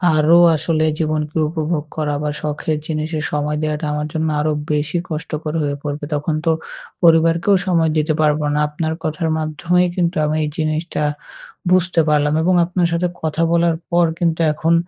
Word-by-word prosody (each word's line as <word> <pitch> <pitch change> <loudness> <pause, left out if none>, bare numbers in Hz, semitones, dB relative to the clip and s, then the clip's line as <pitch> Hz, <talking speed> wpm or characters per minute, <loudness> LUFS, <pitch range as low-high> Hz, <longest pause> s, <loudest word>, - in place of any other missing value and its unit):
আরও 155 +3 +5 0.2
আসলে 155 +1 0
জীবনকে 155 0 -1
উপভোগ 155 -1 -2
করা 150 -2 -1
বা 150 - 0
শখের 150 +1 -2
জিনিসের 155 0 -2
সময় 150 0 -1
দেওয়াটা 155 0 -2
আমার 150 0 -2
জন্য 160 0 -1
আরো 155 +1 +1 0.2
বেশি 150 +3 0
কষ্টকর 155 -1 -4
হয়ে 145 -1 -1
পড়বে। 145 0 -4
তখন 150 +2 -1
তো 165 - +4 0.5
পরিবারকেও 165 +3 +4
সময় 165 -3 +2
দিতে 155 +1 +1
পারবো 150 0 +2
না। 150 - +1
আপনার 160 +1 -2
কথার 160 0 -1
মাধ্যমেই 170 +4 +1
কিন্তু 175 -1 0
আমি 150 +1 0
এই - - -1
জিনিসটা 155 0 -1 0.7
বুঝতে 180 -2 +3
পারলাম। 150 0 +2
এবং 180 +2 +3
আপনার 180 0 0
সাথে 170 +1 +1
কথা 160 +1 -1
বলার 170 -1 +3
পর 175 0 +3
কিন্তু 165 -2 0
এখন 160 +2 +1
155 Hz, 165 wpm, -19 LUFS, 150-170 Hz, 0.7 s, আরও